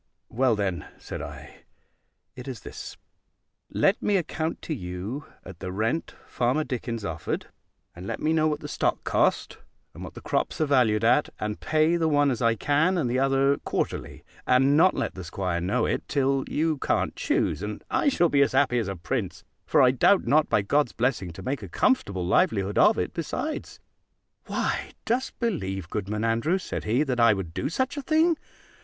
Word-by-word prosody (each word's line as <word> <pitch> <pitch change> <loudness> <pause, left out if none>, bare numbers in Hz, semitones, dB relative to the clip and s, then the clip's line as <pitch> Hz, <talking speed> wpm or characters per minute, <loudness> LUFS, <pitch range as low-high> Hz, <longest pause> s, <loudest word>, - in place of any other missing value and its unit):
"Well, 125 -1 +2
then," 95 -6 -2
said - - -7
I, - - -9 0.8
"it 125 +1 -9
is 130 -3 -6
this: - - -9 0.7
let 195 - +2
me 205 -1 +2
account 160 -2 -3
to 160 - -3
you 100 +5 -5 0.2
at 90 -2 -10
the 95 -1 -5
rent 110 - -2
Farmer 125 +6 0
Dickens 115 -5 -4
offered, 85 -2 -4 0.5
and 90 +2 -8
let - - -3
me 155 +1 +1
know 155 -1 +3
what 150 -1 -2
the - - -6
stock - - -1
cost, - - +1 0.3
and - - -9
what - - -9
the - - -7
crops - - -1
are 155 - +3
valued 120 -7 +3
at; 125 +6 +3
and 105 0 -3
pay 155 +2 +2
the 165 -1 +1
one 145 -2 +3
as 125 - -3
I 115 -1 +3
can, 150 - +2
and 125 -8 0
the 130 - +1
other 135 +1 +3
quarterly; - - -4 0.2
and 135 +3 +4
not 180 +4 +5
let - - -2
the 95 - -8
'squire 85 0 -2
know 90 +4 +1
it - - -2
till 135 -1 +1
you 155 -1 0
can't - - 0
choose; - - 0
and 105 0 -5
I 290 - +3
shall 175 -10 +3
be 140 -3 +3
as 140 - +3
happy 130 -2 +3
as 110 - -2
a 95 - -3
prince; 85 - -4 0.2
for - - +4
I 125 - +6
doubt 180 +9 +3
not, 155 +1 +3
by 100 - +2
God's 145 +5 +1
blessing, 115 -7 -1
to - - -9
make 135 0 -2
a 100 - -8
comfortable 95 -3 +1
livelihood 100 +2 +2
of 215 - +5
it - - -2
besides." 295 - -4 0.7
"Why, - - -2
dost 250 +3 -1
believe, 95 - -2
Goodman 105 +1 -3
Andrews," 115 +12 +1
said - - -5
he, 120 +7 +2
"that 130 -4 -2
I 115 -3 +6
would 90 -4 -5
do - - -2
such 260 - -1
a - - -2
thing? 320 +3 +3
130 Hz, 195 wpm, -26 LUFS, 105-155 Hz, 0.8 s, I